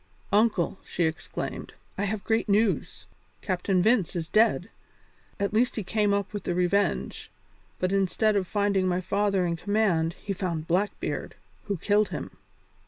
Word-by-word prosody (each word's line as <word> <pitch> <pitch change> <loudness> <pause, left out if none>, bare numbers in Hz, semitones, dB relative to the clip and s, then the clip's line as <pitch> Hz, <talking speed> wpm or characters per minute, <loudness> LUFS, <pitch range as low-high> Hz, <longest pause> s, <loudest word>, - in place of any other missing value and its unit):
"Uncle," 205 -4 +2
she 175 - -2
exclaimed, 160 0 -4 0.2
"I 200 - -1
have 200 0 -3
great 225 -1 0
news. 210 +1 +1 0.4
Captain 185 -1 +1
Vince 220 -6 +2
is 165 -2 -2
dead. 215 0 +2 0.7
At 200 +1 -1
last 240 +3 +2
he 215 - -2
came 210 +1 +1
up 200 0 -1
with 205 -2 -4
the 175 - -1
Revenge, 180 +3 0 0.5
but 185 0 0
instead 195 +2 +2
of 190 -3 +1
finding 200 -2 +1
my 180 0 +1
father 195 0 +1
in 170 -1 0
command 180 -4 +1
he 200 - -5
found 175 -5 -3
Blackbeard, 190 +4 -1 0.3
who 200 -2 -2
killed 210 +4 +2
him. - - -5
200 Hz, 155 wpm, -27 LUFS, 180-210 Hz, 0.7 s, Uncle